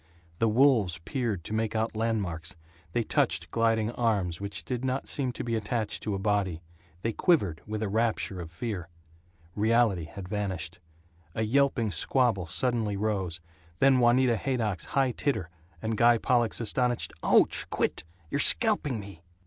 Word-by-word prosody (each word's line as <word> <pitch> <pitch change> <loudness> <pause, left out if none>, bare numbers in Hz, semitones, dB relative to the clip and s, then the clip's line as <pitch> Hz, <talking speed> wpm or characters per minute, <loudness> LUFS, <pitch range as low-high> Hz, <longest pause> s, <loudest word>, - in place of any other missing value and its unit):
The 115 - +3
wolves 115 - +3
peered 115 - -2
to 105 - -6
make 110 0 -1
out 110 0 -1
landmarks, 100 -8 -2 0.4
they 120 - 0
touched - - 0
gliding 115 -1 +1
arms 100 -8 0
which 100 -2 -5
did 125 -1 -3
not 130 +1 -2
seem 130 -3 -1
to - - -5
be 115 - -3
attached 110 0 -2
to 105 -1 -2
a - - -2
body, 95 -4 -1 0.4
they 115 - 0
quivered 100 - +2
with 110 +1 -3
a - - -1
rapture 110 -3 -1
of 85 - -7
fear. 90 -1 -5 0.7
Reality 110 -5 +2
had 95 +2 -9
vanished. 95 -4 -3 0.6
A 110 - 0
yelping 120 -2 +2
squabble 100 - +1
suddenly 110 +1 0
rose, 95 -5 -2 0.4
then 135 +4 +4
Juanita 120 0 +4
Haydock's 110 -6 -1
high 135 -2 +3
titter, 115 - -2 0.3
and 110 0 -1
Guy 120 +2 +5
Pollock's 120 -1 +1
astonished, 120 +1 0
"Ouch! - - +3
Quit! - - -1 0.3
You're 140 - 0
scalping 150 - +4
me!" 100 -1 -10
110 Hz, 155 wpm, -28 LUFS, 100-120 Hz, 0.7 s, Guy